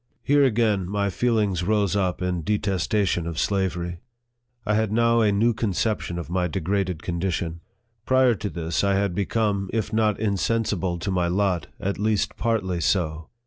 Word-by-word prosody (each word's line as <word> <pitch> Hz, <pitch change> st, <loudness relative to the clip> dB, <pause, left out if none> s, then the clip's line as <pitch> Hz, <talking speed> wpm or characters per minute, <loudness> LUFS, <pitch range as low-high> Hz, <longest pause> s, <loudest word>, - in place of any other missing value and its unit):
Here 145 Hz, +1 st, +4 dB
again 110 Hz, -7 st, +2 dB
my 100 Hz, 0 st, 0 dB
feelings 105 Hz, -6 st, +1 dB
rose 100 Hz, +1 st, +1 dB
up 95 Hz, -2 st, 0 dB
in 90 Hz, -2 st, -1 dB
detestation 95 Hz, -1 st, 0 dB
of 85 Hz, -2 st, -5 dB
slavery. 90 Hz, -3 st, -1 dB, 0.7 s
I 105 Hz, -, +1 dB
had 110 Hz, -1 st, +1 dB
now 115 Hz, +1 st, +3 dB
a 105 Hz, -2 st, +3 dB
new 115 Hz, +4 st, +2 dB
conception 110 Hz, -4 st, -1 dB
of 85 Hz, -, -5 dB
my 90 Hz, +1 st, 0 dB
degraded 90 Hz, +1 st, -2 dB
condition. 85 Hz, -2 st, -2 dB, 0.5 s
Prior 130 Hz, -1 st, +4 dB
to 105 Hz, -1 st, -4 dB
this, 85 Hz, -1 st, -2 dB
I 100 Hz, 0 st, +2 dB
had 100 Hz, -2 st, 0 dB
become, 100 Hz, 0 st, 0 dB
if 110 Hz, -1 st, -2 dB
not 110 Hz, -2 st, +2 dB
insensible 100 Hz, -3 st, 0 dB
to 95 Hz, +4 st, -3 dB
my 90 Hz, -2 st, +1 dB
lot, 90 Hz, -2 st, 0 dB
at 100 Hz, 0 st, -2 dB
least 105 Hz, 0 st, 0 dB
partly 95 Hz, -7 st, -1 dB
so. 80 Hz, -3 st, 0 dB
100 Hz, 160 wpm, -24 LUFS, 90-110 Hz, 0.7 s, Here